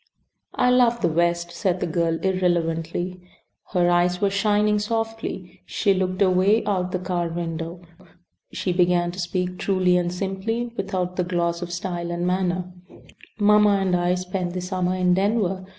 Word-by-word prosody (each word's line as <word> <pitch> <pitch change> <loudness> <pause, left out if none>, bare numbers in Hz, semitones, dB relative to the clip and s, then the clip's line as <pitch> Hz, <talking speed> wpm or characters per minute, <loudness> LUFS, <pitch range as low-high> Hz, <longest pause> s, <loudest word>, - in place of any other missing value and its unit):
"I 250 - +3
love 240 -2 +3
the - - +3
West," 170 +1 0
said 185 -2 -1
the - - -1
girl 165 -1 0
irrelevantly. 175 -1 -1 0.5
Her 180 -3 +2
eyes 175 0 +2
were 200 0 +1
shining 210 +1 +2
softly. 225 -4 -4
She 200 -2 +1
looked 185 +1 0
away 190 +4 +3
out 185 -3 -1
the 185 - 0
car 180 -1 -2
window. 165 0 -5 0.7
She 180 - -2
began 175 -1 +2
to 185 - -9
speak 180 0 -2
truly 185 -2 +2
and 175 -1 0
simply 200 +6 -3
without 185 -3 -3
the 180 - +2
gloss 170 -1 -1
of 175 -1 -5
style 175 -1 -4
and 175 0 -2
manner: 180 0 -1 0.6
"Mamma 210 -1 +5
and 190 -2 +1
I 175 0 +1
spent 180 -1 -3
the 180 - -3
summer 180 0 -1
in 180 -1 +2
Denver. 190 -1 0
180 Hz, 160 wpm, -23 LUFS, 175-195 Hz, 0.7 s, Mamma